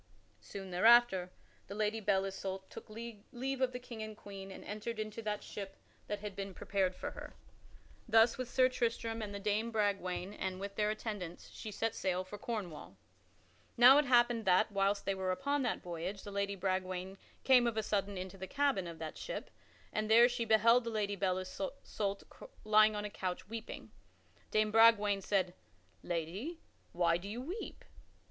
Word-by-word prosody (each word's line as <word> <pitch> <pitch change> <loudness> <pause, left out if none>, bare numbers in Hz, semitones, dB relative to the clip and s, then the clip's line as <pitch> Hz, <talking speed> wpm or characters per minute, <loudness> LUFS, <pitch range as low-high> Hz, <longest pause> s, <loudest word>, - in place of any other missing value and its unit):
Soon 195 -2 -8
thereafter 195 -1 +5 0.4
the 200 - -7
Lady 215 +1 0
Belle 195 -2 +2
Isoult 190 0 -5
took - - -10
leave 235 +4 -6
of 255 -1 +2
the 250 - -4
King 245 -3 -9
and 215 0 -5
the - - -20
Queen 195 -1 -9
and 190 - -10
entered 215 +2 -5
into 215 +1 -4
that 210 -1 -3
ship 195 -1 -7 0.3
that 205 -1 -3
had 210 -2 -6
been 195 -1 -5
prepared 190 -2 0
for - - -5
her. - - -10 0.7
Thus, 225 +1 +6
with 255 -2 -5
Sir 255 +1 +4
Tristram 230 -2 -1
and 210 -2 -4
with 200 -1 -6
Dame 215 +2 +1
Bragwaine 200 -3 -1
and 185 -2 -4
with 200 0 -5
their 210 0 +1
attendants, 205 -5 -5
she 215 - -7
set 225 +2 -1
sail 185 -1 -1
for 200 +2 -9
Cornwall. 200 -10 -5 0.8
Now 255 +4 +9
it 295 - +2
happened 240 -2 +4
that, 190 +4 +4
whilst 200 0 +1
they 195 - +1
were 190 -1 -2
upon 280 +9 0
that 245 -3 -1
voyage, 180 +3 -5
the 205 - -7
Lady 200 0 -1
Bragwaine 185 0 -2 0.2
came 250 -2 +6
of 230 -2 -2
a 220 - +1
sudden 200 -1 -1
into 185 +1 -6
the 190 - -5
cabin 280 -10 +1
of 165 -1 -7
that 160 -1 -6
ship - - -5 0.4
and 215 0 -1
there 235 +2 +8
she 245 -1 -2
beheld 230 +3 +5
the 230 - -3
Lady 210 -2 -1
Belle 185 -2 0
Isoult 200 -1 -4 0.4
lying 215 0 +6
upon 210 0 -3
a - - -3
couch 185 -2 -4
weeping. 225 +1 -7 0.6
Dame 215 0 +2
Bragwaine 210 -3 +5
said, 185 -2 0 0.5
"Lady, 180 - -4 0.3
why 170 -1 +2
do 190 +3 -8
you 225 +4 -4
weep?" 345 - -6
210 Hz, 180 wpm, -34 LUFS, 190-230 Hz, 0.8 s, Now